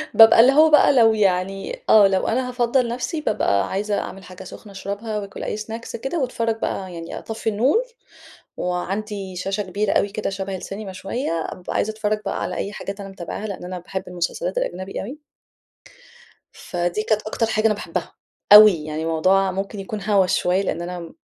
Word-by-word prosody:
بابقى 225 0 +8
اللي 250 +3 +6
هو 310 +2 +6
بقى 300 -1 +6
لو 225 -4 +5
يعني 195 - -1
آه، 210 -2 +8
لو 190 -1 0
أنا 250 +2 0
هافضّل 245 0 +1
نفسي، 255 +6 -3
بابقى 100 - +1
عايزة 205 +1 -1
أعمل 195 0 -7
حاجة 185 +1 -11
سُخنة 200 +2 -11
اشربها، 200 +3 -4
واكل 200 -1 -8
أي - - -3
Snacks 225 +2 -7
كده، 325 +5 -2
واتفرّج 230 -4 -1
بقى 190 -4 -3
يعني 165 -1 -7
أطفّي 225 0 -4
النور، 255 - +2 0.8
وعندي 190 +2 -3
شاشة 195 +3 -2
كبيرة 200 +2 -1
أوي 200 - +2
كده 210 +1 -3
شَبَه 195 0 -4
السينما 195 +2 -7
شوية، 195 +8 -4 0.2
أبقى 180 - -7
عايزة 215 - 0
اتفرّج 215 0 -1
بقى - - -2
على - - -3
أي 200 - -3
حاجات 200 0 -6
أنا 195 - -7
متابعها، 195 +2 -6
لإن 200 -4 -6
أنا 180 0 -5
باحب 190 +2 -5
المسلسلات 180 - -3
الأجنبي 190 - -4
أوي. 260 +9 -7 1.3
فدي 175 +3 -3
كانت 215 -1 0
أكتر 225 +1 -1
حاجة 220 0 +1
أنا 215 - +3
باحبها، 205 - -5 0.4
أوي 210 0 +11
يعني 155 +1 -4
موضوع 185 +4 +2
ممكن 195 +2 -4
يكون 205 +1 -6
هوّس 195 -3 +2
شوية، 180 +2 +1
لإن 185 - -2
أنا 180 +1 -5
م 170 - -10
200 Hz, 185 wpm, -22 LUFS, 185-225 Hz, 1.3 s, أوي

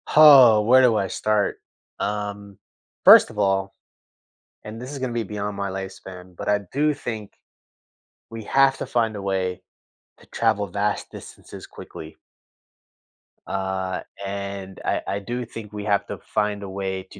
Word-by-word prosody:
Oh, 135 -8 +9
where 125 +4 +5
do 120 -3 +4
I 95 - 0
start? 105 +2 -1 0.4
Um, 100 -1 -4 0.5
first - - +9
of 110 - -13
all 95 -1 +1 0.9
and 110 +2 -8
this 125 - -7
is 140 - -6
gonna 130 -2 -3
be 120 -1 -1
beyond 105 0 -5
my 100 -1 -3
lifespan, 95 -1 -8
but - - -6
I 105 0 +3
do 150 +2 +2
think 110 -7 -6 1.0
we 115 -1 -8
have 135 +2 +3
to - - -4
find 115 -3 0
a 100 - -6
way 95 -2 -2 0.6
to - - -20
travel 110 -3 0
vast 100 +3 -2
distances - - -11
quickly. 80 0 -11 1.3
Uh, 95 -1 -3 0.2
and 100 -1 -6
I - - 0
I 100 - -2
do 120 +4 -5
think 110 -2 -10
we 105 0 -6
have 100 -1 +1
to - - -6
find 105 -1 -2
a 100 - -7
way 95 -1 -4
to 100 - -13
105 Hz, 155 wpm, -23 LUFS, 95-115 Hz, 1.3 s, Oh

